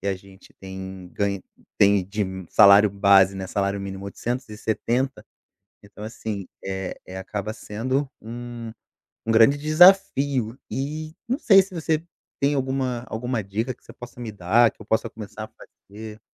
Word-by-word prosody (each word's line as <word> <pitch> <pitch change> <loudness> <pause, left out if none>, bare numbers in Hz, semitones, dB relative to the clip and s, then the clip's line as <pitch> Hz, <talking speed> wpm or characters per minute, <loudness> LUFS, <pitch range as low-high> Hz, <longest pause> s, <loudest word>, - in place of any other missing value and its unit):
que 100 - -6
a 95 - +1
gente 95 +1 -18
tem 95 -1 -8
ganho 100 -2 -1 0.4
tem 100 -1 +5
de 105 +2 -1 0.3
salário 100 0 +7
base, 100 -1 +5
né, 95 0 -5
salário 100 +1 -1
mínimo, 95 0 -6
870. 120 +4 -2 0.6
Então, 100 0 -13
assim, 110 -3 -5 0.2
eh 95 -1 -4
eh, 95 - -8
acaba 100 +2 -4
sendo 130 +6 -2
um 120 0 -7 0.5
um 115 - 0
grande 115 +6 +6
desafio 145 - +4
e 155 +3 -4
não 250 +3 0
sei 195 -8 +7
se 190 0 -9
você 160 -2 -1 0.4
tem 140 +1 +3
alguma 130 -2 -1
alguma 120 0 -2
dica 110 +6 -3
que - - -30
você - - -13
possa 120 0 -11
me 115 -3 -5
dar, 105 +4 +3
que - - -20
eu - - -11
possa 110 - 0
começar 105 0 -8
a - - -18 0.4
fazer. 110 +1 -9
110 Hz, 160 wpm, -24 LUFS, 100-130 Hz, 0.6 s, salário